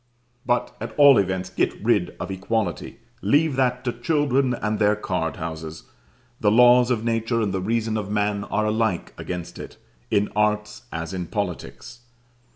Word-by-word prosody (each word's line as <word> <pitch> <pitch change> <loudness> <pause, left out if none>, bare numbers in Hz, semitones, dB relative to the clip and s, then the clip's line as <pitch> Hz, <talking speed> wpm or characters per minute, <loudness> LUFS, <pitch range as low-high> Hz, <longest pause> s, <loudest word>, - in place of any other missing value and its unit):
But, 120 0 0
at 115 0 -6
all 140 -5 +8
events, 95 -1 -1
get - - -1
rid 105 -6 +1
of - - -4
equality; 100 +1 -2 0.2
leave 150 -1 +2
that 125 -1 +1
to 120 -2 -1
children 135 -1 +1
and 105 -2 -2
their 105 0 +3
card 90 -5 -2
houses: 80 -1 -6 0.6
the 105 - +3
laws 125 +2 +6
of 115 -3 0
nature 115 0 0
and 105 -4 -1
the 95 - -1
reason 110 +2 -1
of 105 -2 -4
man 105 -1 0
are 110 0 -1
alike 110 -4 -1
against 90 -2 -6
it, - - -9 0.3
in 105 -1 +1
arts, 105 +1 0
as 80 +3 -5
in 90 -2 -4
politics. 120 - -5
110 Hz, 165 wpm, -23 LUFS, 95-120 Hz, 0.6 s, all